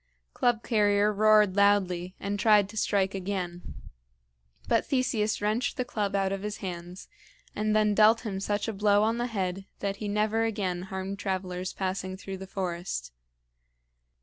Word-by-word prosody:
Club 240 -2 +1
carrier 210 -2 +2
roared 210 -2 +4
loudly, 190 -3 +2
and 200 +1 -3
tried 210 -2 +5
to 220 - -11
strike 195 -2 +1
again; 185 -2 -3 1.1
but - - +3
Theseus 235 -6 0
wrenched 215 +7 0
the 255 - -1
club 205 -4 -2
out 195 -1 +1
of 195 0 -3
his 210 +1 -4
hands, 180 -1 -7 0.5
and 215 0 0
then 210 -1 +3
dealt 215 +2 +5
him 200 -5 -4
such 205 +2 -1
a 225 - -2
blow 205 0 +3
on 225 +2 +1
the 240 - 0
head 195 -4 -3
that 200 0 -3
he 210 - -5
never 215 +2 +1
again 200 -6 -1
harmed 190 +1 -4
travelers 185 -1 -3
passing 185 0 -3
through 195 0 -7
the 190 0 -9
forest. 175 - -4
200 Hz, 160 wpm, -28 LUFS, 190-215 Hz, 1.1 s, tried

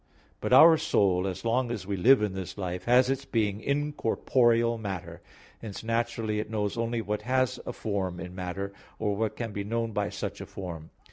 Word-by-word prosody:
But - - -3
our 160 +5 +9
soul, 95 -2 +2
as 95 +4 -5
long 120 +2 +1
as 110 -5 -4
we 100 +1 -2
live 120 +5 +5
in 105 -3 -1
this 95 0 -6
life, 90 -2 -4
has 125 +1 +5
its 135 +1 -1
being 105 -5 -1
in 145 +3 -1
corporeal 115 -2 +2
matter; 95 -5 -6 0.4
hence 110 -2 -7
naturally 115 -2 -1
it 105 - -4
knows 105 -2 -1
only 115 0 -1
what 105 0 -2
has 130 0 0
a - - -1
form 95 -6 -3
in 90 +1 -7
matter, 95 +2 -4 0.2
or 105 -2 -1
what 110 +1 -1
can 115 -2 -4
be 100 - -3
known 115 +2 -2
by 105 -1 -1
such - - -5
a - - -7
form. 85 -4 -7
110 Hz, 200 wpm, -28 LUFS, 100-120 Hz, 0.4 s, our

